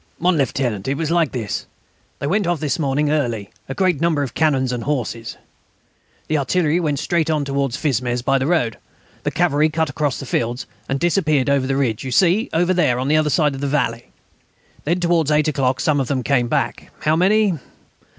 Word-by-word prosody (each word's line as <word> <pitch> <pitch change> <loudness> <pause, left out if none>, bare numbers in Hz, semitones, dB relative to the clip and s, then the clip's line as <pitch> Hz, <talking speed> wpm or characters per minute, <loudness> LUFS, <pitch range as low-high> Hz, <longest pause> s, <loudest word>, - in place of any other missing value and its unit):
"Mon 180 +1 +2
Lieutenant, 125 -7 -1
it 135 +1 0
was 160 0 -2
like 170 -3 +2
this.... 110 -6 -4 0.5
They 140 - -4
went 190 +5 +1
off 175 -2 0
this 145 -1 -1
morning 145 0 +1
early, 120 -9 -1
with - - -34
a 135 - -4
great 185 -6 +1
number 160 -4 +2
of 135 - -5
cannons 135 -5 +1
and 120 -2 -4
horses. 120 -5 -3 0.9
The 155 -1 +1
artillery 160 +3 +1
went 150 -5 0
straight 160 +2 0
on 150 -2 0
towards 140 -2 -1
Fismes 125 -4 -1
by 135 +1 +2
the 130 - -1
road. 125 -11 0 0.4
The - - -1
cavalry 155 -3 +2
cut 160 -1 -1
across 145 -3 -1
the 135 - -6
fields, 120 0 -2 0.2
and 135 0 0
disappeared 155 -6 +2
over 135 -2 +1
the 135 0 0
ridge 120 -6 0
you 130 - -4
see 185 - +3
over 175 +3 +2
there 150 -9 +2
on 130 +2 -1
the 155 - +4
other 155 -1 +2
side 150 0 +2
of 135 - -6
the 140 - -1
valley. 125 -5 -1 0.8
Then 170 +4 +1
towards 170 -3 +2
eight 150 0 +3
o'clock 130 -3 0
some 150 -2 +2
of 135 - -1
them 130 -1 -1
came 125 -3 +2
back. - - -2
How 155 +1 +2
many? 195 0 +3
145 Hz, 210 wpm, -20 LUFS, 130-160 Hz, 0.9 s, the